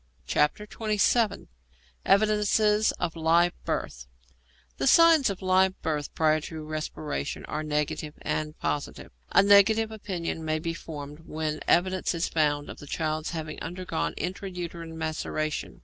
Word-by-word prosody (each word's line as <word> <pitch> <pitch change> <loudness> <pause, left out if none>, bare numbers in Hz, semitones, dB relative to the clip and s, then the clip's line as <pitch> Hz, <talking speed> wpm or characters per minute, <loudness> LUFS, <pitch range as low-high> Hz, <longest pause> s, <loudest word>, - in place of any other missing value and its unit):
XXVII. 210 +5 +1 0.6
EVIDENCES 210 +1 +3
OF 170 -1 -3
LIVE 165 +2 +3
BIRTH 60 0 -3 0.7
The 135 - 0
signs 330 -6 +6
of 195 -1 -5
live 185 0 +3
birth 150 -3 -2
prior 155 -1 +3
to 160 0 -7
respiration 155 -1 -4
are 150 - -3
negative 150 0 -2
and 155 0 -2
positive. 145 - -3 0.2
A - - +6
negative 215 +2 +5
opinion 180 -6 -4
may 155 0 0
be 165 +1 -3
formed 150 -3 -8
when 155 -1 -3
evidence 185 0 +2
is 170 - 0
found 145 -2 +1
of - - -9
the 145 - -11
child 155 0 -2
having 160 -2 -5
undergone 160 - -3
intra 190 +2 -4
uterine 170 -2 -6
maceration. 155 -1 -3
165 Hz, 135 wpm, -27 LUFS, 155-195 Hz, 0.7 s, signs